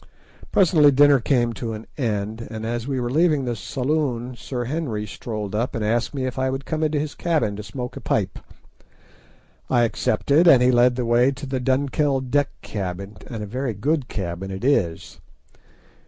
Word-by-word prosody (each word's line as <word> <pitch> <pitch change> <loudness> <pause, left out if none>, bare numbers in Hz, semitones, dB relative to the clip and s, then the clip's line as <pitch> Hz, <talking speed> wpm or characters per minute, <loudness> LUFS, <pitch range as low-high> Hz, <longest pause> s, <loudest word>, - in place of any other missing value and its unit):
Presently 165 -6 +5
dinner 145 0 +6
came 120 -1 +1
to 115 -1 -4
an 110 +1 -7
end, 110 -2 -2
and 110 -1 -6
as 120 +1 -3
we 135 -2 -1
were 120 -1 -2
leaving 155 -2 +2
the 120 -1 -2
saloon 130 -1 -2
Sir 125 0 -4
Henry 120 -6 -3
strolled 105 0 -5
up 115 +4 -1
and 110 -2 -1
asked 115 +3 0
me 130 -2 -1
if 130 0 -4
I 130 0 +1
would 135 +1 -4
come 155 0 -2
into 155 -1 +1
his 150 0 -3
cabin 150 -12 0
to - - -5
smoke 125 +4 -6
a - - -7
pipe. - - -1 1.3
I 120 -2 +3
accepted, 140 +8 +2
and 130 -7 +7
he 125 - +5
led 125 0 +4
the 125 -1 -2
way 120 +2 +4
to 135 - -8
the 130 -1 -2
Dunkeld 135 0 0
deck 145 0 +2
cabin, 100 0 -5
and 115 -4 -5
a - - -4
very 125 +2 -3
good 140 +5 0
cabin 95 -1 -4
it 95 +2 -6
is. 85 -13 0
125 Hz, 185 wpm, -23 LUFS, 110-140 Hz, 1.3 s, and